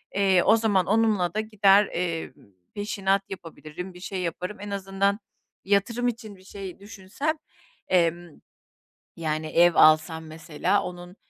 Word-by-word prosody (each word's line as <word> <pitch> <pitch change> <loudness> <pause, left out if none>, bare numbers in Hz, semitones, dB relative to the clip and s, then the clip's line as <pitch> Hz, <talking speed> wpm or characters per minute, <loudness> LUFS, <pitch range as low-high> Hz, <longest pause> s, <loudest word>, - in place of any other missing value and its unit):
Eee, 195 -2 +3
o 220 - +5
zaman 205 -5 +2
onunla 210 -5 +1
da 215 - -1
gider, 205 -2 +4
emm, 170 -2 -3 0.4
peşinat 200 -1 0
yapabilirim, 180 0 -9
bir 180 - -13
şey 190 0 -5
yaparım. 180 +3 -4
En 205 - -7
azından 195 +1 -1 0.5
yatırım 205 +5 +1
için 225 -4 -5
bir 185 - -19
şey 195 -1 -9
düşünsem, 205 +10 -4 0.5
emm, 175 -2 0 0.7
yani, 155 -1 -3
ev 170 +2 +4
alsam 160 +1 +4
mesela 160 +4 -1
onun, 180 0 -8
190 Hz, 135 wpm, -25 LUFS, 175-205 Hz, 0.7 s, o